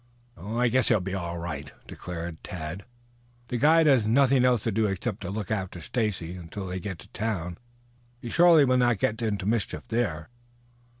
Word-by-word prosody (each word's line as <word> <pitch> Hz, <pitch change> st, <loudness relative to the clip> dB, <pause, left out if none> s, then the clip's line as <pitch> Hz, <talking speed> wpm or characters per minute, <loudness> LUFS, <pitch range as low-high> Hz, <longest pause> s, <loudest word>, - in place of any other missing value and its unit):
"I 115 Hz, +7 st, -1 dB
guess 130 Hz, +2 st, +2 dB
he 115 Hz, -, +4 dB
will 105 Hz, -, +1 dB
be 95 Hz, +1 st, -4 dB
all 85 Hz, -3 st, -3 dB
right," 80 Hz, -4 st, -5 dB
decided 85 Hz, -2 st, -7 dB
Tad. 85 Hz, +2 st, -6 dB, 0.6 s
"The 125 Hz, -, -1 dB
guide 160 Hz, +5 st, +5 dB
has 135 Hz, -6 st, +5 dB
nothing 130 Hz, +3 st, +4 dB
else 125 Hz, -4 st, +3 dB
to 115 Hz, -, 0 dB
do 110 Hz, +1 st, +1 dB
except 100 Hz, +2 st, -3 dB
to 90 Hz, -, -5 dB
look 105 Hz, +1 st, -4 dB
after 95 Hz, -4 st, -3 dB
Stacy 95 Hz, -3 st, -2 dB
until 90 Hz, +3 st, -7 dB
they 90 Hz, 0 st, -4 dB
get 95 Hz, -1 st, -5 dB
to 75 Hz, -, -14 dB
town. 90 Hz, -6 st, -3 dB, 0.6 s
He 120 Hz, -1 st, -7 dB
surely 170 Hz, -4 st, +6 dB
will 130 Hz, -1 st, +3 dB
not 120 Hz, -3 st, +3 dB
get 110 Hz, +4 st, -1 dB
into 105 Hz, -4 st, -1 dB
mischief 110 Hz, -1 st, -1 dB
there." 110 Hz, -6 st, -2 dB
105 Hz, 185 wpm, -27 LUFS, 90-120 Hz, 0.6 s, surely